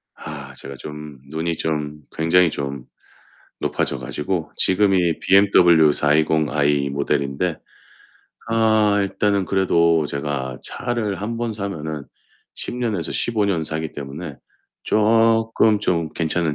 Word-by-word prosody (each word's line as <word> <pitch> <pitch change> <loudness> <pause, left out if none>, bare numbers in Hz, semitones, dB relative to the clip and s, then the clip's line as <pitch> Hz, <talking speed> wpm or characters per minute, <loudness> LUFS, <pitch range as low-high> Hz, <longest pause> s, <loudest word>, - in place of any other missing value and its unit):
아, 70 -3 -9
제가 70 +1 -9
좀 75 0 -9
눈이 80 +2 -2
좀 75 -1 -3
굉장히 85 +2 +4
좀 70 -3 -5 0.8
높아져 70 - -1
가지고 80 +6 -3
지금이 95 -3 +2
BMW 90 -6 +5
420 75 +1 +2
I 70 -1 +1
모델인데 70 +4 -1 0.9
아 110 -2 +3
일단은 100 0 0
그래도 85 -4 +2
제가 70 -2 -4
차를 115 -5 -3
한번 115 +2 -3
사면은 80 -8 -5 0.5
10 - - -6
년에서 110 -10 -2
15 110 -3 0
년 90 -5 0
사기 80 0 -3
때문에 70 +2 -7 0.5
쪼끔 115 0 +3
좀 85 -5 0
괜찮은 80 -1 -1
80 Hz, 215 characters per minute, -21 LUFS, 75-100 Hz, 0.9 s, BMW